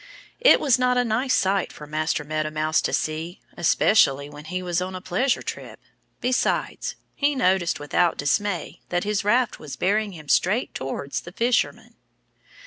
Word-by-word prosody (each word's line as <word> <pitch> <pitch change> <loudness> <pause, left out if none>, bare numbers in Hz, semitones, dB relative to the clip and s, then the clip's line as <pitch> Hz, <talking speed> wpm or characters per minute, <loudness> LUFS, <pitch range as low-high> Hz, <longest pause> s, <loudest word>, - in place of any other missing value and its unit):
It - - +6
was 265 -4 +3
not 250 0 +2
a 245 - +3
nice 245 +4 +1
sight 195 0 +1
for 150 - -10
Master 155 0 -1
Meadow 155 +1 -2
Mouse 155 +1 +1
to - - -1
see, 160 +3 -2 0.2
especially 145 -5 +3
when 150 +1 -11
he 185 +3 -4
was 175 0 -1
on 185 +1 -4
a - - -4
pleasure 240 +9 0
trip. - - -7 0.4
Besides, 255 +1 0 0.2
he 285 0 +1
noticed 185 - +1
with 145 0 -10 0.2
dismay 185 +6 -1
that 175 0 0
his 205 -1 -1
raft 235 +4 +2
was 150 -3 -7
bearing 205 +2 0
him 155 -3 -11
straight 205 - +2
towards 135 +1 -4
the 175 - -10
fisherman. 235 +5 -1
185 Hz, 165 wpm, -24 LUFS, 155-220 Hz, 0.4 s, It